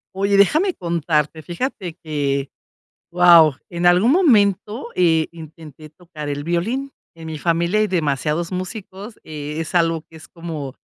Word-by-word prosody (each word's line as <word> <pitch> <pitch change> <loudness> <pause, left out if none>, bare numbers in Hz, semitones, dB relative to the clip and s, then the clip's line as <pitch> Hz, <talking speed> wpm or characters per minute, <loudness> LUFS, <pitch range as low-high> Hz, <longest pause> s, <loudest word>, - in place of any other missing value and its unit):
Oye, 200 +1 +1
déjame 310 - +3
contarte, 160 -3 -1
fíjate 180 - -4
que, 140 -3 -2 0.6
wao, 170 -5 +6
en 175 0 -3
algún 180 +9 +5
momento, 220 - +2
eh, 160 -3 +2
intenté 155 -2 -12
tocar 155 -2 -9
el 145 0 -4
violín. 230 +12 -2 0.2
En 165 -1 -9
mi 160 -1 -5
familia 170 +6 +1
hay 215 - +2
demasiados 155 -1 -1
músicos, 190 +3 -7
eh, 150 -1 -6
es 165 +2 -5
algo 165 -2 +1
que 165 - -16
es 160 - -14
como, 160 -6 -7
170 Hz, 145 wpm, -20 LUFS, 155-190 Hz, 0.6 s, wao